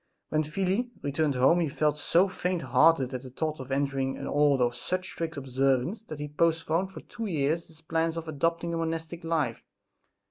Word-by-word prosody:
When 155 - +2
Felix 190 +9 0
returned 145 0 0
home 130 +7 +5
he 165 -3 +1
felt 150 +1 0
so 175 +5 +4
faint 180 -3 -2
hearted 130 +1 +4
at 130 - -3
the 130 - -9
thought 155 +4 -3
of 130 0 -7
entering 135 -1 0
an - - -6
order 145 -3 +3
of 120 0 0
such 185 0 -2
strict 160 -2 -4
observance 135 - +1
that 155 - -7
he 150 - -3
postponed 165 +3 +1
for - - -9
two 230 -2 -6
years 160 -1 0
his 160 -1 -18
plan 165 +1 0
of 165 0 -5
adopting 165 +3 0
the 165 - -1
monastic 165 +1 -3
life. 155 -8 0
155 Hz, 190 wpm, -28 LUFS, 140-165 Hz, -, home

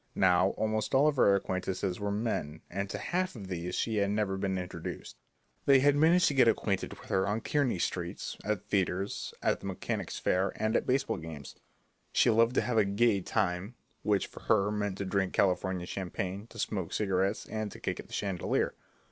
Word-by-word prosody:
Now, 90 0 +4
almost 110 +3 0
all 140 +3 +5
of 150 -2 +1
her 100 -5 +6
acquaintances 95 0 -2
were 100 0 -2
men, 100 -8 -2
and 100 +2 -3
to - - -3
half 185 -1 -1
of 100 -5 -8
these 90 0 -3
she 110 -2 0
had 100 -1 +2
never 105 -2 0
been 95 -1 -1
introduced. 90 -1 -6 0.5
They 135 -1 +7
had 145 +1 +5
managed 165 +4 +5
to - - -2
get 130 -3 +5
acquainted 100 -3 +1
with - - -14
her 95 +1 +2
on 105 +2 0
Kearney 140 -7 +1
Street, 85 0 -3
at 105 -3 -2
theatres, 95 0 -1
at - - +2
the - - -7
Mechanics' - - -3
Fair, 95 +2 +1
and 110 +1 0
at - - +1
baseball 135 +2 +1
games. 80 -4 -8 0.6
She 120 - +4
loved 115 +3 +3
to - - +4
have 120 -2 +1
a - - +5
"gay" 100 0 +2
time, 95 +5 -1 0.3
which 105 -2 +1
for - - -12
her 105 -1 +2
meant 105 -2 -2
to 100 - -3
drink 95 0 0
California 95 -1 +1
champagne, 95 +2 -4
to 115 - -14
smoke 95 -5 -2
cigarettes, 95 0 0
and 110 -2 -4
to - - -10
kick - - -3
at - - -8
the - - -14
chandelier. 95 -4 0
100 Hz, 200 wpm, -30 LUFS, 95-110 Hz, 0.6 s, They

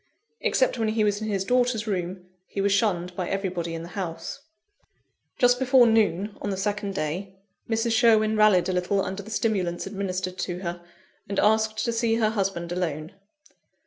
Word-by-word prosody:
Except - - +1
when 225 - +1
he 215 0 +1
was 205 0 +1
in 215 - -3
his 195 -2 -1
daughter's 245 -2 +1
room, 180 -3 -3 0.2
he - - -6
was 200 +1 +2
shunned 180 -4 +1
by 180 -1 -3
everybody 180 -4 -2
in 165 - -5
the 170 - -9
house. 180 +4 -5 1.0
Just 245 -1 +4
before 260 -1 +5
noon, 210 -3 +2
on 205 - -2
the 195 - -2
second 205 0 -2
day, 185 +5 -3 0.3
Mrs. 225 +1 +1
Sherwin 220 -2 +4
rallied 210 -4 +5
a 185 - 0
little 180 +2 +1
under 190 +1 -4
the 205 - -12
stimulants 190 -6 -1
administered 185 -2 -4
to 175 -1 -2
her, 175 -1 -4 0.5
and 200 - -3
asked 220 0 +2
to 235 - 0
see 230 0 +1
her 220 -2 +2
husband 190 -5 -2
alone. 165 -2 -3
200 Hz, 175 wpm, -25 LUFS, 180-220 Hz, 1.0 s, before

